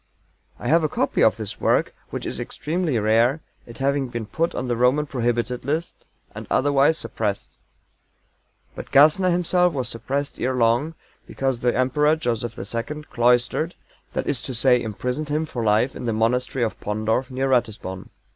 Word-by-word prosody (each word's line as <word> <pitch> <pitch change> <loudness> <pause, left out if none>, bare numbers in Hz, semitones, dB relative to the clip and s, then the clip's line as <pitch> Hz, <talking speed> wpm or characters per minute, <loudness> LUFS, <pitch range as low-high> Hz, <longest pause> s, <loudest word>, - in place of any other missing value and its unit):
I - - -6
have 165 +5 +4
a 155 - +1
copy - - 0
of - - +4
this - - -6
work, - - +2 0.2
which - - -5
is - - -3
extremely 160 -4 -2
rare, 115 +6 +3 0.3
it 115 - -11
having 140 0 0
been 120 -2 -5
put 165 +10 -1
on 130 - -3
the 120 - 0
Roman 125 +5 +2
prohibited 120 -2 -1
list, 155 +6 -2 0.4
and - - -8
otherwise 145 +3 +3
suppressed. 105 -9 -4 1.1
But - - -8
GASSNER 155 +6 +5
himself 180 0 +2
was 130 -4 -3
suppressed 140 +5 -3
ere 130 +1 0
long, 120 +7 +2 0.3
because 135 -3 -1
the 120 0 +1
Emperor, 150 +4 +3
Joseph 120 -6 -3
II, 115 +10 -4
cloistered 125 +7 +2 0.4
that - - -2
is 135 - 0
to 130 - -5
say, 125 0 +4
imprisoned 125 +7 -3
him 155 +2 0
for 125 -6 -4
life 110 +4 +2
in - - -6
the 115 - 0
Monastery 125 +3 0
of 110 - -5
Pondorf, 110 +5 -1
near 135 +1 -1
Ratisbon. 110 -7 -1
125 Hz, 165 wpm, -23 LUFS, 115-150 Hz, 1.1 s, GASSNER